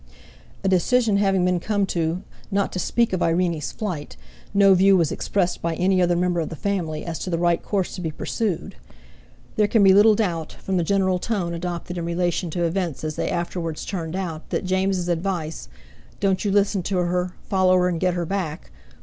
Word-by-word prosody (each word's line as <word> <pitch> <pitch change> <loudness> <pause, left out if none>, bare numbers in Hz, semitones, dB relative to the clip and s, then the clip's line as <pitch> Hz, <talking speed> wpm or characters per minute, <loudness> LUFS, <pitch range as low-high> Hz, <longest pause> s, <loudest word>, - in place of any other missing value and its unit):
A - - +1
decision 210 +4 +3
having 195 -2 +2
been 180 -1 +2
come 205 +2 0
to 170 -1 -2 0.3
not 200 -1 0
to 185 - -3
speak 235 +4 +1
of 185 - 0
Irene's 165 -2 0
flight, 180 -9 -5 0.3
no 200 -1 +6
view 190 +1 +5
was 165 -4 +1
expressed 180 -3 -1
by 165 -1 -1
any 185 +2 +2
other 175 -1 +3
member 175 0 +1
of 160 - -2
the 165 - -6
family 170 -4 -2
as 165 -2 -4
to - - -4
the 170 - 0
right 175 0 +2
course 195 -3 -2
to 185 - -6
be 165 - -2
pursued; 190 - -3 0.8
there 210 -1 +4
can 215 0 +3
be 190 -1 +7
little 210 +2 +6
doubt, 170 -7 -2
from 190 -1 -3
the 175 - +2
general 190 0 +1
tone 185 -5 -2
adopted 175 +1 -4
in 170 - -3
relation 175 0 -1
to 175 +2 -2
events 170 -4 -2
as 155 -1 -3
they - - -2
afterwards 170 -2 -3
turned 170 -3 -4
out, 170 -5 -5
that - - -2
James's 185 -1 0
advice: 165 - -2 0.5
"Don't 195 -2 +1
you 205 - 0
listen 200 -1 +2
to 185 +2 -2
her, 180 0 -1
follow 185 -1 +3
her 180 0 +3
and 175 -2 -1
get 180 0 +1
her 175 -1 -1
back!" 175 -3 -4
180 Hz, 200 wpm, -23 LUFS, 170-195 Hz, 0.8 s, be